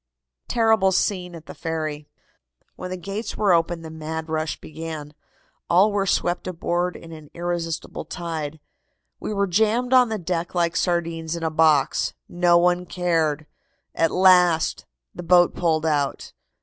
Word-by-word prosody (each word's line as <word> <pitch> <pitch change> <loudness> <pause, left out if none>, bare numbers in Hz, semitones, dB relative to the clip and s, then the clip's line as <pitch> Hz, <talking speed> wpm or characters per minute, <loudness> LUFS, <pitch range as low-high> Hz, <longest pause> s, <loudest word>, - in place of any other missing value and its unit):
TERRIBLE 220 -5 +3
SCENE 180 -2 -1
AT 160 -1 -11
THE - - -9
FERRY. 155 -2 -4 0.7
"When 180 - -7
the 185 - -4
gates 200 +5 -5
were 200 -4 +3
opened 165 0 0
the 160 - -8
mad 160 0 -5
rush 155 0 -2
began. 155 -2 -7 0.6
All 190 +5 +5
were 200 -1 0
swept 175 0 0
aboard 175 0 -1
in 165 - -11
an 155 -2 -11
irresistible 170 -1 -4
tide. 160 -3 -5 0.6
We - - -5
were 200 -1 +1
jammed 220 +7 +1
on 250 -2 +6
the 220 - -2
deck 175 -1 -3
like 170 -1 +1
sardines 165 -2 -1
in 170 - -6
a 160 - 0
box. 155 -3 +2
No 175 0 +3
one 180 +1 +2
cared. 160 -4 0 0.5
At 165 - +2
last 180 -3 +4 0.3
the - - -7
boat 175 0 +4
pulled 160 -2 0
out. 145 -3 -1
170 Hz, 150 wpm, -23 LUFS, 160-180 Hz, 0.7 s, on